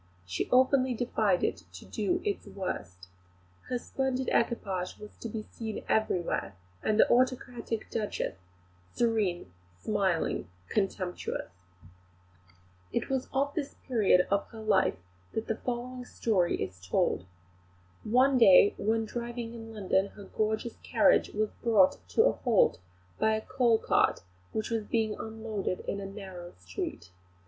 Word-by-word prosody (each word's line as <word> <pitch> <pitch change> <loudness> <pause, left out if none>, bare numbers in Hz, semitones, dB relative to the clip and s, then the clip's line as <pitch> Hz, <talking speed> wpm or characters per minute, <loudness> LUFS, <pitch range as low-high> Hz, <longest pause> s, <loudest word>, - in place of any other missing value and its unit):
She 90 -1 -3
openly 260 0 +4
defied 215 -6 +1
it - - +1 0.2
to 90 - -10
do 215 - -1
its 410 -1 -2
worst. 90 - -5 0.6
Her 250 - 0
splendid 265 +1 -1
equipage 195 -6 0
was 210 0 -11
to 230 - -5
be 215 0 -4
seen 220 -1 -6
everywhere, 175 - 0 0.3
with 215 - +2
the - - +6
autocratic 245 -2 0
Duchess, 210 - -2 0.6
serene, 205 - 0 0.2
smiling, 190 - 0 0.2
contemptuous. 190 - -2 1.4
It - - -2
was 265 -1 -1
of 280 +2 0
this 290 -4 -3
period 210 -8 +4
of 200 0 +1
her 225 -2 -10
life 205 -3 +3 0.4
that 220 - -2
the 225 - -2
following 250 +1 -4
story 200 -7 +1
is 90 -1 -5
told. 90 0 0 0.8
One 255 +4 +4
day 200 -2 +8
when 225 +2 +1
driving 235 0 -5
in 225 -1 -8
London 195 -2 +1
her 205 - -10
gorgeous 220 +3 -2
carriage - - +4
was 215 0 -1
brought 215 -6 +4
to 445 - +4
a - - +5
halt 225 - +2 0.4
by 220 0 +3
a 220 - -2
coal 250 -3 +3
cart - - +2 0.3
which 220 +1 -3
was 225 -1 +1
being 220 0 0
unloaded 220 -4 -4
in 200 - -3
a 195 - -5
narrow 190 -3 -8
street. 90 -1 -6
220 Hz, 140 wpm, -30 LUFS, 190-240 Hz, 1.4 s, day